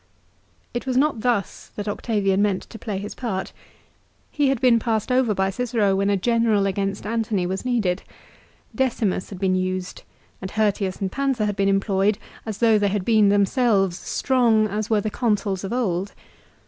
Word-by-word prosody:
It 240 +2 -4
was 255 -1 0
not 285 -3 +2
thus 235 -4 -1
that 205 0 -5
Octavian 205 -2 0
meant 205 -2 +1
to 225 - -9
play 210 -4 -4
his 200 +2 -6
part. 195 -7 -4 0.8
He 290 -2 +1
had 270 -3 0
been^ 245 -2 +4
passed 225 0 -1
over 250 -4 +2
by 190 0 +1
Cicero 220 -3 0
when 200 +1 +1
a 200 - +2
general 225 -1 +2
against 195 +1 -2
Antony 215 -4 -1
was 190 +2 -3
needed. 215 -8 0 0.7
Decimus 230 -8 -1
had 195 - -8
been 185 0 +1
used, 185 0 -2 0.4
and 190 - -5
Hirtius 205 -3 0
and 190 -1 -1
Pansa 270 -4 0
had 205 -1 -1
been 195 0 +1
employed 195 +1 +1 0.3
as 215 -2 -4
though 225 -2 +4
they 205 - +2
had 200 -1 -1
been 215 -3 +4
them 200 0 +4
selves 195 -6 +1
strong 235 -5 +2
as 210 +1 -3
were 215 -2 +2
the 215 - -3
Consuls 205 -5 -1
of 195 - -4
old. 200 -6 -1
210 Hz, 180 wpm, -23 LUFS, 195-230 Hz, 0.8 s, been^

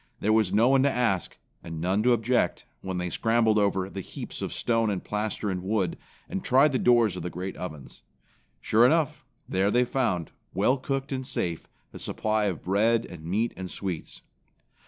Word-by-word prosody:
There 110 +2 +2
was 110 -4 +3
no 110 +5 +4
one 135 0 +5
to 140 - +4
ask 115 -9 0 0.3
and 80 -1 -6
none 95 +5 +1
to 125 +3 +3
object 120 +2 +1 0.2
when 95 -1 -4
they 90 -1 -3
scrambled 115 -1 +2
over 95 -2 +1
the 95 0 -6
heaps - - -7
of - - -3
stone 115 -2 +1
and 95 -3 -2
plaster 105 0 -3
and 90 -1 -3
wood, 95 -2 0 0.3
and 195 0 -4
tried 135 +3 +5
the 130 - 0
doors 120 -5 +4
of - - -5
the 90 - -3
great 90 +2 -5
ovens. 75 -7 -8 0.6
Sure 110 - +3
enough, 155 +3 +2 0.2
there 95 +2 +1
they 125 +3 +3
found, 110 - -1 0.2
well 125 +8 +2
cooked 135 +1 -3
and 130 -1 -3
safe, 85 - -3 0.3
a - - -8
supply 110 -1 -1
of 95 -6 -2
bread 110 +5 +2
and 85 -3 -10
meat 105 +7 0
and 95 -1 -6
sweets. 90 -5 -5
105 Hz, 190 wpm, -27 LUFS, 95-120 Hz, 0.6 s, one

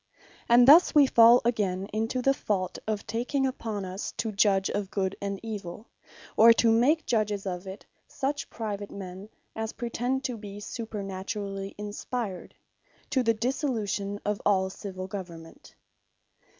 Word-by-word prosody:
And 240 +1 +7
thus 320 +4 +8
wee 290 -2 +8
fall 235 -1 +7
again 195 -5 0
into 225 +4 -1
the 275 - +4
fault 195 -8 -2
of 215 -2 -2
taking 255 +4 -1
upon 220 -6 -3
us 185 +2 -5
to 225 - -3
Judge 195 -1 +3
of 205 -2 -3
Good 195 -2 -1
and 200 -1 -3
Evill; 210 -2 -6 0.5
or 230 +1 +8
to 230 0 +3
make 285 +8 +3
Judges 210 -4 0
of 180 0 -4
it, 190 +2 -9 0.2
such 280 +1 -3
private 205 -3 -5
men 190 +1 -8 0.3
as 220 0 -4
pretend 245 +3 -2
to 250 -3 -3
be 205 -1 -9
supernaturally 195 -2 -5
Inspired, 210 -1 -5 0.6
to 265 -3 +2
the 230 -2 +2
Dissolution 215 -5 -2
of 210 0 -1
all 190 -2 +2
Civill 185 -2 -7
Government. 175 -4 -9
210 Hz, 145 wpm, -27 LUFS, 195-235 Hz, 0.6 s, thus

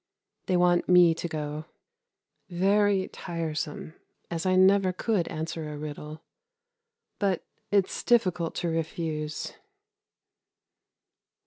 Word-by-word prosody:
They 185 - +2
want 175 0 +3
me 180 -2 +7
to 170 +1 -4
go. 150 -1 -4 0.8
Very 195 +2 +2
tiresome, 160 -2 -4 0.4
as 170 +2 -2
I 185 - +3
never 190 0 +5
could 185 -1 0
answer 160 -1 -4
a 150 - -6
riddle; 150 +1 -7 1.0
but 195 -4 0 0.3
it's 200 -2 +1
difficult 185 -8 +2
to 175 - -1
refuse. 160 -1 -3
170 Hz, 100 wpm, -27 LUFS, 155-185 Hz, 1.0 s, me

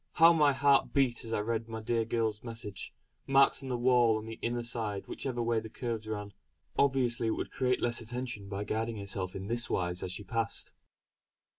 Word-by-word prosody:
How 165 +1 +7
my 150 -3 +5
heart 140 0 +3
beat 130 -3 +2
as 115 - -5
I 105 - +1
read 115 +1 -2
my 110 0 -4
dear 115 +1 0
girl's 110 -2 -1
message, 115 -4 -6 0.4
marked 135 +1 +5
on 135 - -6
the 125 - 0
wall 120 -2 +4
on 110 - -6
the 115 0 -7
inner 120 0 -1
side 110 -4 -3
whichever 120 -3 -3
way 115 -1 +2
the 110 0 -8
curves 115 -1 -4
ran. 105 -2 -4 0.4
Obviously 125 -4 +2
it 110 - 0
would - - -4
create 125 -1 +1
less 120 0 +1
attention 120 -3 -5
by 100 0 -3
guiding 110 +2 -2
herself 100 -2 -3
in 95 - -5
this 120 +2 -2
wise 90 0 -1
as 90 - -3
she 100 +3 -5
passed. 115 +1 -2
115 Hz, 200 wpm, -31 LUFS, 110-125 Hz, 0.4 s, How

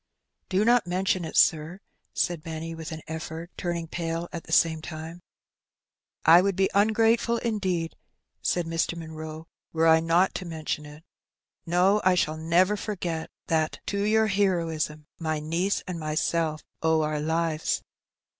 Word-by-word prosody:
^^ - - -50
"Do 195 +2 +2
not 240 -5 +4
mention 185 0 0
it, - - -4
sir,^^ 160 +3 +3 0.3
said 175 -3 -1
Benny, 165 +1 -5
with 165 +1 -7
an 160 -1 -7
effort;, 160 +2 -6
turning 170 -2 -3
pale 165 +1 -3
at 170 - -6
the - - -11
same 160 -1 +3
time. 160 +2 -7 0.6
" - - -47
I 175 - +8
would 195 0 0
be 190 +1 +2
ungrateful 225 +3 +3
indeed,*' 190 -8 -1 0.5
said 175 -1 0
Mr. 165 +1 -1
Munroe, 160 -1 -7
" - - -55
were 165 0 +2
I 160 0 +7
not 165 +3 +3
to 185 - -7
mention 155 -2 -4
it. 150 +2 -13 0.6
No, 185 +5 +3
I 185 0 +4
shall 155 -3 +1
never 175 +5 +3
forget 175 -6 -4 0.2
that 155 -1 0
to 200 0 -1
your 220 +2 +3
heroism 165 -7 0
my 160 -2 -1
niece 170 +6 -1
and 180 -3 -5
myself 155 0 -1 0.2
owe 160 -1 +3
our 150 0 -1
lives." 160 +1 0
165 Hz, 160 wpm, -26 LUFS, 160-185 Hz, 0.6 s, I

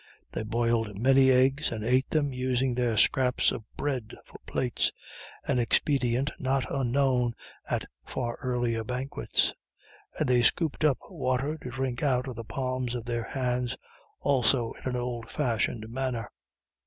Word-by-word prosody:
They - - -3
boiled 115 -1 0
many 135 +3 +5
eggs 130 +3 +3
and 110 -2 -3
ate 130 +3 +2
them, 145 -3 +1
using 130 0 +1
their 120 -2 +1
scraps 125 +3 +3
of - - -5
bread 130 -6 -2
for - - -13
plates 125 -2 0 0.6
an 125 - +2
expedient 125 +2 +2
not 135 0 +1
unknown 130 -2 +2 0.3
at - - 0 0.2
far 120 -2 -3
earlier 120 -3 0
banquets 125 +4 0 0.6
and 155 - +1
they 125 -1 +4
scooped 155 +6 +1
up 150 -4 +4
water 130 +4 0
to 125 - -6
drink 125 0 -2
out 130 -3 +2
of 130 - -5
the 115 - -6
palms 130 0 -2
of 120 -1 -4
their 120 -1 -2
hands 125 -2 -1 0.4
also 125 -3 +2
in - - -5
an 125 - -2
old 120 -1 -3
fashioned 115 -5 0
manner. 120 -2 -3
125 Hz, 150 wpm, -28 LUFS, 120-135 Hz, 0.6 s, many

